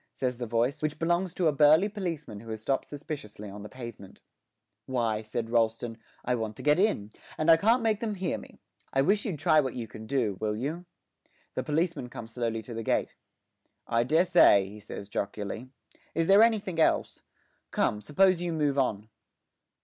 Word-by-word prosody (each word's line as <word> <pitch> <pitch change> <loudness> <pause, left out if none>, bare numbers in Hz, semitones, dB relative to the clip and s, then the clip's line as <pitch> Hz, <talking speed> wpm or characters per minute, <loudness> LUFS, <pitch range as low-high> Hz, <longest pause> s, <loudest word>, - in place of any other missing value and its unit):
says 125 -2 -2
the 120 - -3
voice, 120 +6 0
which 155 0 -1
belongs 175 +2 0
to 180 +1 -1
a - - +4
burly 150 +6 +5
policeman 170 - -5
who 115 +2 -11
has 110 -1 -4
stopped 135 +5 -1
suspiciously 135 -9 -7
on 100 +1 -9
the 105 - -8
pavement. 115 -6 -10 0.7
'Why,' 115 -4 0
says 110 +1 -3
Rolleston, 115 0 0 0.3
'I 125 - +1
want 110 -2 -4
to - - -10
get 150 +3 +4
in, 145 - +1 0.3
and 155 +2 +4
I 165 - +8
can't 230 +7 +3
make 220 -2 +2
them 220 -3 -2
hear 185 -3 -2
me. - - -14 0.3
I 135 - +2
wish 200 +6 +2
you'd 185 -7 -2
try 155 +1 +4
what 130 -4 -1
you 115 -2 -4
can 110 +1 -10
do, 115 -8 0
will 105 -1 0
you?' 150 +10 -4 0.7
The - - -1
policeman 160 -4 -1
comes 115 -2 -9
slowly 115 -2 -2
in - - -19
to 115 - -8
the 115 - -4
gate. - - 0 0.7
'I 115 0 +1
dessay,' 160 - +5
he 105 +1 -11
says 100 -1 -8
jocularly. 105 +4 -4 0.5
'Is 165 +1 +2
there 195 +4 +7
anythink 210 -7 +2
else? 160 - +2 0.5
Come, 105 0 0
suppose 180 - +3
you 175 -1 -1
move 145 -3 +1
on.' 110 -5 0
135 Hz, 190 wpm, -28 LUFS, 110-165 Hz, 0.7 s, I